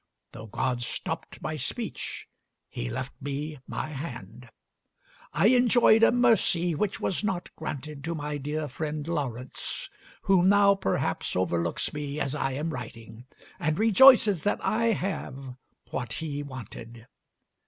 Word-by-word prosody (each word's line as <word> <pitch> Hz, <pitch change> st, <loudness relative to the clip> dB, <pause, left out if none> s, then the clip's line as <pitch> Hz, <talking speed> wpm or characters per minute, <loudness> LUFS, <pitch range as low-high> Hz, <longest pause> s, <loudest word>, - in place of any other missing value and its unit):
Though 110 Hz, -, -9 dB
God 125 Hz, +3 st, -1 dB
stopped -, -, -5 dB
my -, -, -2 dB
speech, -, -, -4 dB, 0.4 s
He -, -, -4 dB
left -, -, -4 dB
me 145 Hz, +2 st, -4 dB
my -, -, -4 dB
hand. 125 Hz, -, -8 dB, 0.8 s
I 205 Hz, -, +4 dB
enjoyed 240 Hz, -2 st, +5 dB
a 230 Hz, -, +7 dB
mercy 215 Hz, -8 st, +3 dB
which 195 Hz, +5 st, -1 dB
was 190 Hz, -, -1 dB
not 190 Hz, -4 st, -3 dB
granted 150 Hz, -2 st, -6 dB
to 170 Hz, +1 st, -2 dB
my 150 Hz, -1 st, -3 dB
dear 150 Hz, +2 st, -3 dB
friend 150 Hz, +2 st, -4 dB
Lawrence, 130 Hz, -6 st, -4 dB, 0.3 s
who 190 Hz, -2 st, +4 dB
now 200 Hz, +2 st, +6 dB
perhaps 195 Hz, -, -1 dB
overlooks 85 Hz, -2 st, 0 dB
me 150 Hz, 0 st, -4 dB
as 135 Hz, -2 st, -1 dB
I 135 Hz, -2 st, -1 dB
am 155 Hz, +5 st, -2 dB
writing, 115 Hz, -2 st, -9 dB, 0.3 s
and 155 Hz, 0 st, 0 dB
rejoices 220 Hz, -, +7 dB
that 205 Hz, -, +1 dB
I 230 Hz, +2 st, +1 dB
have 180 Hz, -, -2 dB, 0.4 s
what 120 Hz, -, -3 dB
he 145 Hz, -3 st, -3 dB
wanted. 120 Hz, -4 st, -9 dB
150 Hz, 135 wpm, -27 LUFS, 130-195 Hz, 0.8 s, a